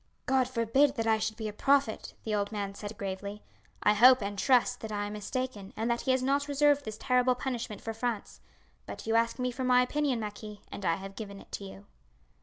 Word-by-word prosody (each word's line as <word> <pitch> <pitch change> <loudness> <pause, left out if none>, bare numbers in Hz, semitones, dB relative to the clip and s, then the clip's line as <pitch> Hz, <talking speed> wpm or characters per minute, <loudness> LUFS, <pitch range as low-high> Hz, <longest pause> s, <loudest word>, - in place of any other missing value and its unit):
"God 260 -1 +2
forbid 260 +4 +2
that 225 -3 -1
I 220 -1 +3
should 215 0 -2
be 220 -2 -3
a 210 - -5
prophet!" 270 0 +1
the 220 - -2
old 205 0 0
man 200 -2 -3
said 205 +1 -7
gravely. 200 +1 -5 0.4
"I 210 - +5
hope 250 +4 +7
and 200 +1 -3
trust 250 +3 +3
that 220 - -6
I 205 -1 -2
am 205 - -5
mistaken, 210 -1 -4
and 225 +2 0
that 235 - 0
He 265 - +1
has 260 0 +2
not 280 +2 +1
reserved 290 0 +3
this 215 -1 -5
terrible 250 0 +2
punishment 245 -4 -4
for 225 - -3
France. 225 - -4 0.5
But 100 - -7
you 225 - 0
asked 230 0 +2
me 250 -1 -1
for 260 +2 -4
my 250 0 +5
opinion, 275 -1 0
marquis, 210 -1 -7
and 200 - -6
I 165 - +3
have 195 +2 -8
given 200 -2 -7
it - - -16
to 200 - -5
you." 195 +1 -11
225 Hz, 225 wpm, -30 LUFS, 205-255 Hz, 0.5 s, hope